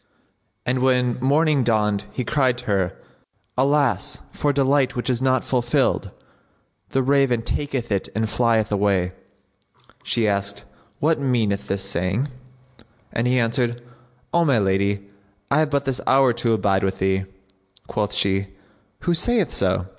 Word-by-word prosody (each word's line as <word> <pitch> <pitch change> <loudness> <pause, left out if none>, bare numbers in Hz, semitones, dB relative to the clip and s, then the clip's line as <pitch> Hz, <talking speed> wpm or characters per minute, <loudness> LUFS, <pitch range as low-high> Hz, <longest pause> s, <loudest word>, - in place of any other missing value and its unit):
And 125 +1 0
when 125 -1 +2
morning 145 +1 +3
dawned 105 -3 +1
he 125 - -3
cried 130 -4 +1
to - - -8
her, 95 -4 0 0.6
"Alas 140 +2 +1
for 145 - 0
delight 135 -1 +2
which 125 +1 -1
is 125 0 -1
not 130 0 +2
fulfilled! 120 -2 0 0.8
The 135 - +1
raven[FN#66] 135 -4 +2
taketh 135 -6 -2
it 100 -2 -1
and 110 0 +1
flieth 115 -1 +1
away!" 100 -3 +1 0.9
She 115 -2 0
asked, 100 0 -2 0.4
"What 155 +1 +2
meaneth 115 -7 0
this 95 0 -2
saying?"; 100 - -1 0.8
and 120 +1 0
he 125 +1 +2
answered, 120 0 0 0.5
"O 170 - +4
my 140 -6 +3
lady, 100 0 0 0.4
I 140 - +4
have 155 -1 +2
but 140 -1 0
this 135 -2 -1
hour 130 -2 +5
to 115 -1 0
abide 95 -2 +1
with 95 -1 -1
thee." 95 0 0 0.6
Quoth 105 -1 -2
she 100 0 +1 0.5
"Who 175 - +1
saith 210 +2 +1
so?" 95 -1 0
120 Hz, 145 wpm, -22 LUFS, 100-135 Hz, 0.9 s, hour